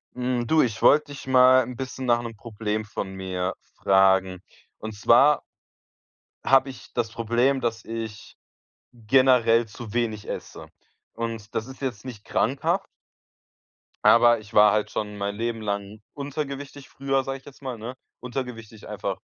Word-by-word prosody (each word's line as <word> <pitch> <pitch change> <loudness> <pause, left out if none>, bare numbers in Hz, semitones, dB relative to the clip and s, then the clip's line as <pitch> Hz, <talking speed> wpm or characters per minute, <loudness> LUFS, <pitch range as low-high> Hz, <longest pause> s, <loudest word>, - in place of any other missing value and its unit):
Hm, 125 -1 -1
du, 160 +3 +4
ich 115 -3 -3
wollte 150 0 +5
dich 140 -2 -9
mal 130 0 +6
'n 125 +1 -7
bisschen 130 +1 -6
nach 120 -1 +3
'nem 115 -1 -7
Problem 110 -1 -4
von 100 -2 -5
mir 95 -1 -3 0.2
fragen. 95 -1 +3 0.4
Und 110 -1 -7
zwar 125 +8 +5 1.0
habe 135 0 +4
ich 130 - -12
das 115 -2 -1
Problem, 120 +4 +1
dass 115 -2 -2
ich 110 -2 -7 0.6
generell 120 -1 +3
zu 110 0 -10
wenig 110 -3 -2
esse. - - -7 0.4
Und 115 -2 -6
das 110 - -2
ist 130 +1 -12
jetzt 120 -5 -4
nicht 120 -5 -9
krankhaft 150 - 0 1.2
aber 120 0 +6
ich 110 0 -15
war 105 0 +7
halt 105 0 0
schon 105 -1 -4
mein 100 0 -3
Leben 115 +1 -3
lang 100 0 -4
untergewichtig 140 -1 -6
früher, 135 0 -1
sage 135 +1 -4
ich - - -28
jetzt 140 - -14
mal, 130 -3 -5
ne? 115 +4 -7 0.3
Untergewichtig 120 -4 -7
einfach - - -4
115 Hz, 150 wpm, -25 LUFS, 105-130 Hz, 1.2 s, war